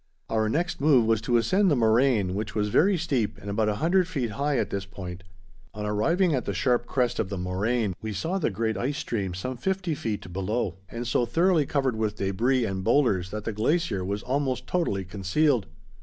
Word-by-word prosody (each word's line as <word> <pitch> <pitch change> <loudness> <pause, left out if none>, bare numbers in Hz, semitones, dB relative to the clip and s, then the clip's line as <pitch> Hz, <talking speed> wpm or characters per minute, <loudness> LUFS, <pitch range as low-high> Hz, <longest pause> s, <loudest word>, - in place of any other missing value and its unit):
Our 110 -1 +1
next 165 +4 -1
move 140 -6 +5
was 110 -1 +2
to 120 +2 +2
ascend 190 - +3
the 150 - +3
moraine, 115 -4 +3
which 105 +3 -4
was 105 -1 0
very 190 - +4
steep 130 - -1
and 100 0 -6
about 105 +1 +1
a 105 - 0
hundred 175 - +2
feet 135 -11 -2
high 140 +3 0
at - - -1
this 100 -1 -2
point. 95 -2 -8 0.5
On 105 0 -4
arriving 165 - +2
at 130 -4 -1
the 100 - -2
sharp 120 +5 +1
crest 125 -2 0
of 95 - -1
the 100 - -4
moraine, 100 +4 -1
we 110 - -4
saw 165 - -2
the 160 - +1
great 110 0 -1
ice 135 +7 -2
stream 95 -6 -3
some 130 +7 -4
fifty 185 +3 -1
feet 105 -9 -4
below, 95 0 -2
and 120 +1 -5
so 120 0 +1
thoroughly 165 +2 +2
covered 135 -4 0
with 110 -1 -1
debris 115 +6 +1
and 95 -2 -3
boulders 95 -9 +2
that 105 +2 -5
the 115 - -3
glacier 115 - 0
was 100 +2 -3
almost 130 -1 -1
totally 100 - -1
concealed. 100 - +1
115 Hz, 205 wpm, -26 LUFS, 100-140 Hz, 0.5 s, move